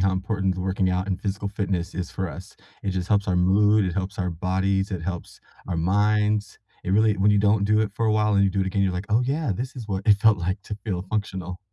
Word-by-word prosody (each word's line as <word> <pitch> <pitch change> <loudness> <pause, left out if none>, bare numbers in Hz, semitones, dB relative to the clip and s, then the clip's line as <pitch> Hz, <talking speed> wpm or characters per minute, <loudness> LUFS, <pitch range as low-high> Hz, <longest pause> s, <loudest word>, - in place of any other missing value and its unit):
how 95 0 +2
important 95 0 -1
working 95 0 0
out 90 +1 -1
and 95 - -2
physical 100 0 -3
fitness 95 -4 -2
is 90 -1 -4
for 95 -2 -3
us, 90 +2 -10 0.3
it 100 - 0
just 95 -1 -3
helps 100 -1 +2
our 90 - +2
mood, 105 +3 +4
it 90 - -2
helps 95 +1 -3
our 90 -2 -1
bodies, 95 +3 0
it 90 - -3
helps 90 -1 -6 0.3
our 90 - -1
minds, 105 +4 +1 0.3
it - - -2
really 105 +1 +3
when 100 +2 +3
you 105 - +3
don't 105 0 +3
do 105 +1 +3
it 110 -2 0
for 115 -1 0
a 110 - +3
while 105 -1 +2
and 100 - +4
you 95 - +2
do 100 +1 -1
it 95 - 0
again, 100 +1 0
you're 95 -2 +1
like, 90 +3 -4
"Oh, 110 +3 +3
yeah. 140 +1 -1
This 125 +6 -5
is 120 -4 -7
what 95 -1 -2
it 105 - +6
felt 110 -1 +4
like 95 +3 -2
to 105 - -6
feel 90 -5 -2
functional. 95 -3 -4
95 Hz, 260 wpm, -24 LUFS, 95-105 Hz, 0.3 s, it